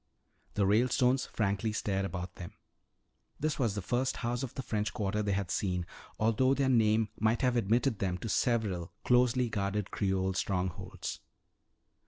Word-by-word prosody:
The 100 - +2
Ralestones 125 +5 +3
frankly 105 +1 -1
stared 100 -2 -1
about 90 -2 -5
them. 85 - -8 0.9
This 155 0 -1
was 115 -6 +1
the 105 - -3
first 125 +6 0
house 120 +1 -2
of 130 -4 -5
the 130 - -4
French 105 -2 -2
Quarter 105 0 -1
they 105 -1 -1
had 95 -3 -2
seen, 90 -3 -1 0.3
although 115 +5 +3
their 135 -1 +1
name 110 -3 +3
might 110 +3 +2
have 125 -1 +3
admitted 115 +2 +2
them 90 -2 -1
to 95 - -6
several 105 -7 0
closely 125 0 +3
guarded 100 -2 -2
Creole 95 -1 0
strongholds. 90 -1 -3
105 Hz, 155 wpm, -31 LUFS, 95-120 Hz, 0.9 s, Ralestones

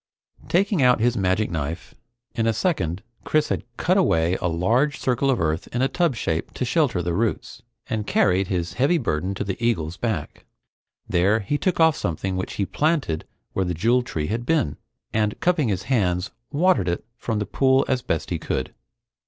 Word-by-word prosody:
Taking 195 -1 +2
out 125 -2 +5
his 120 +2 +2
magic 95 +1 +1
knife, 80 +1 -4 0.4
in 115 0 0
a 115 - +3
second 95 - -1 0.2
Chris 155 -1 +1
had - - 0 0.2
cut 185 +3 +2
away 85 - +3
a 90 - +1
large 115 - +1
circle 130 +2 +1
of 130 - +2
earth 80 -1 -1
in 125 +2 -1
a - - +4
tub 170 -3 +1
shape 80 -7 -2
to 125 - -1
shelter 120 - +1
the 85 0 -1
roots, 110 +4 -2 0.3
and 105 -2 -3
carried 95 +1 +2
his 90 -2 -2
heavy 140 +7 +2
burden 95 - -1
to - - -2
the 100 +3 -4
eagle's 85 -8 0
back. 105 -11 -3 0.6
There, 100 +6 +2
he 145 +9 -1
took 185 -3 0
off 160 -2 +5
something 95 +3 -2
which 95 - -3
he 100 - -1
planted 145 - 0 0.3
where 95 - +1
the 90 -1 -2
Jewel 115 +9 +3
Tree 85 -11 -3
had 115 +7 -2
been, 120 - +1 0.4
and 105 -1 0
cupping 175 -7 +2
his 95 -3 -1
hands, 90 -8 0 0.2
watered 160 - +3
it 85 - -3
from 115 -2 -3
the 105 - -1
pool 130 +3 +3
as 130 -2 +1
best 80 -6 -2
he 85 - -1
could. - - -3
110 Hz, 190 wpm, -23 LUFS, 90-135 Hz, 0.6 s, out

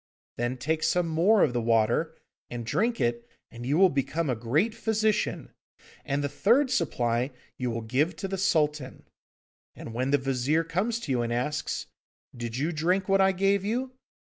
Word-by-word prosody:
Then 120 +2 -2
take 155 +5 -1
some 180 +1 +1
more 180 +6 +4
of 125 - +2
the 120 - 0
water, 115 +8 +1 0.3
and 120 -1 -5
drink 230 - 0
it, 120 0 -1 0.2
and 120 0 -8
you 145 +3 +2
will 190 +1 +7
become 140 +2 -1
a - - 0
great 140 - 0
physician, 220 -1 -1 0.5
and 140 +1 -1
the - - +1
third 245 - +2
supply 120 - 0 0.3
you 125 -1 -1
will 115 0 -3
give 135 +9 0
to 195 - -4
the 195 0 -4
Sultan. 150 -7 0 0.7
And 115 - -8
when 130 +3 -1
the 145 - +4
Vizir 135 +4 0
comes 200 +8 -1
to 145 - -4
you 125 -2 +1
and 120 0 -2
asks, 125 +5 -2 0.5
"Did 120 -1 -5
you 150 +6 0
drink 180 +4 0
what 195 0 +4
I 190 0 +5
gave 195 +1 +1
you?" 245 +5 -2
150 Hz, 180 wpm, -27 LUFS, 120-195 Hz, 0.7 s, will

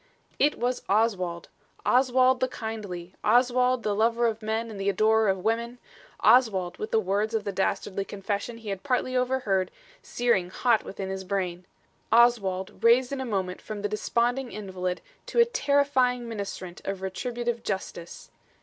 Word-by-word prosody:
It 295 - +3
was 245 +1 -1
Oswald! 190 -5 +1 0.4
Oswald, 255 0 +4
the 255 - +2
kindly! 205 -7 -6
Oswald, 250 0 +3
the 210 - 0
lover 230 +3 +2
of 225 -1 0
men 220 +1 -2
and 200 -2 -7
the 195 - +1
adorer 215 +2 +3
of 190 -1 -1
women! 235 +2 -1 0.4
Oswald, 190 -8 +4
with 215 - -4
the 225 - +3
words 210 +3 0
of 220 - 0
the 200 - -3
dastardly 195 0 -1
confession 205 +3 -4
he 225 -2 -8
had 195 -1 -3
partly 255 -1 -1
overheard 250 -8 +1 0.3
searing 235 -7 0
hot 230 +3 +2
within 195 -1 -6
his 190 0 -4
brain! 180 -2 -3 0.4
Oswald, 200 -6 +3
raised 245 +3 +5
in 275 -1 -3
a - - -3
moment 190 -5 -2
from 210 -1 -7
the - - +2
desponding 240 +4 0
invalid 185 -3 -4 0.3
to - - -6
a 470 - +8
terrifying 280 - +1
ministrant 200 -5 -6
of 195 -1 -4
retributive 235 +5 -3
justice. 180 -4 -6
220 Hz, 160 wpm, -27 LUFS, 195-245 Hz, 0.4 s, a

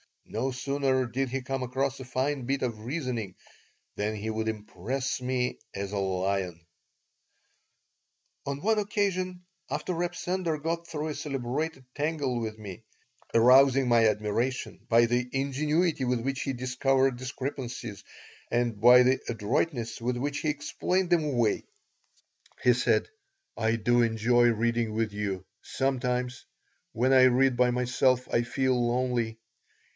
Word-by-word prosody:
No 135 - -2
sooner 130 0 0
did 130 +3 -2
he 135 +2 -2
come 135 +1 -3
across 130 +2 -1
a 130 - -7
fine 130 +1 -1
bit 135 +2 -1
of 115 -4 -2
reasoning 125 - -3 0.6
than 105 +1 -1
he 105 +1 -4
would 110 0 -2
impress 110 +5 -3
me 125 0 -1 0.2
as 100 0 -4
a 100 - -1
lion 95 -3 -1 1.8
On 140 0 -3
one 220 +2 +2
occasion, 190 -4 -1 0.3
after 180 - -2
Reb 175 +1 -2
Sender 180 -3 -1
got 165 +3 -3
through 155 -2 -3
a - - -2
celebrated 135 +1 -3
tangle 145 -4 -1
with 110 -1 -4
me, 100 -4 -9 0.5
arousing 130 +2 +6
my 115 -1 +5
admiration 110 +4 -1
by 115 0 +6
the 120 +1 0
ingenuity 150 +3 +1
with 125 -1 0
which 135 +2 -2
he 135 - -2
discovered 130 +1 +1
discrepancies 125 -4 -5 0.5
and 120 -3 0
by 125 +2 +8
the 130 +1 +3
adroitness 115 +1 -1
with 125 +1 -1
which 140 +3 -2
he 155 - -1
explained 170 +5 -1
them 165 -3 +3
away, 120 -7 +1 1.0
he 125 - +6
said: 125 - +1 0.5
"I 110 0 +1
do 120 +2 +2
enjoy 120 +1 +3
reading 115 -1 +1
with 110 -1 0
you. 100 -2 -3 0.2
Sometimes, 125 -2 -2 0.5
when 125 +4 +2
I 130 -1 +7
read 130 0 +4
by 125 0 +4
myself, 125 +1 +1
I 120 - +3
feel 130 +2 0
lonely. 120 -2 0
125 Hz, 140 wpm, -28 LUFS, 115-135 Hz, 1.8 s, by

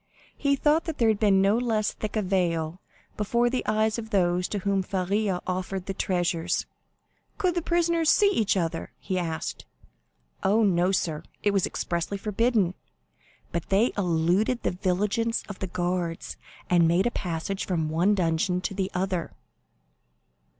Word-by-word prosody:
He 280 -1 +1
thought 300 +4 +2
that 325 -3 -4
there 230 -2 +3
had 215 -2 +1
been 195 -3 +4
no 205 +4 +3
less 220 -4 0
thick 215 0 -5
a 215 - +1
veil 175 -3 0 0.4
before 235 +3 +1
the 255 - -1
eyes 215 +1 +1
of 220 -1 -7
those 180 -3 +2
to 210 - -3
whom 195 0 0
Faria 190 +1 -1
offered 185 0 -3
the 195 - -3
treasures. 175 -2 0 0.7
"Could 370 -4 +1
the 345 - -1
prisoners 335 -1 +2
see 405 -1 +5
each 215 - +1
other?" 165 -2 -2
he 185 -2 -2
asked. 165 -2 -4 0.8
"Oh, 215 +4 +3
no, 180 -2 +3
sir, 160 -5 -1 0.2
it 205 - +3
was 195 -2 +2
expressly 170 +3 -2
forbidden; 210 -2 +1 0.8
but 170 - -3
they 205 +5 +3
eluded 180 +6 +1
the - - +1
vigilance 205 +6 0
of 205 - -8
the 190 - -3
guards, 175 -1 -2 0.3
and 175 -2 +4
made 175 +5 +3
a 240 - +1
passage 180 +1 -3
from 165 -4 0
one 175 +7 +2
dungeon 180 0 +1
to 190 - -3
the 190 -1 -2
other." 180 -2 -1
195 Hz, 160 wpm, -26 LUFS, 175-220 Hz, 0.8 s, see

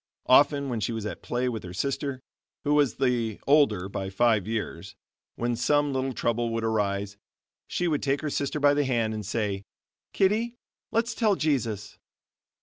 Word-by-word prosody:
Often, 140 +1 +5
when 120 -3 -2
she 115 - -1
was 110 -2 -4
at 105 - -5
play 125 +1 -1
with 115 -4 -2
her 90 0 -8
sister, 135 +3 -2 0.4
who 145 - +2
was 145 -5 +3
the 120 -5 0
older 140 -11 +4
by 95 0 -4
five 110 0 +2
years, 110 -1 -4 0.4
when 120 0 -1
some 145 +4 +2
little 130 0 -1
trouble 120 -1 0
would 115 0 -2
arise, 100 -2 -1 0.5
she 180 - -1
would 150 -3 0
take 140 0 0
her 155 - -2
sister 140 +2 -1
by 145 0 +5
the 145 0 +2
hand 115 -4 0
and 110 -1 -4
say: 100 -1 -2 0.5
"Kitty, 220 +5 +1 0.3
let's 230 +1 0
tell 215 -4 +2
Jesus." 115 - -1
120 Hz, 170 wpm, -27 LUFS, 110-145 Hz, 0.5 s, Often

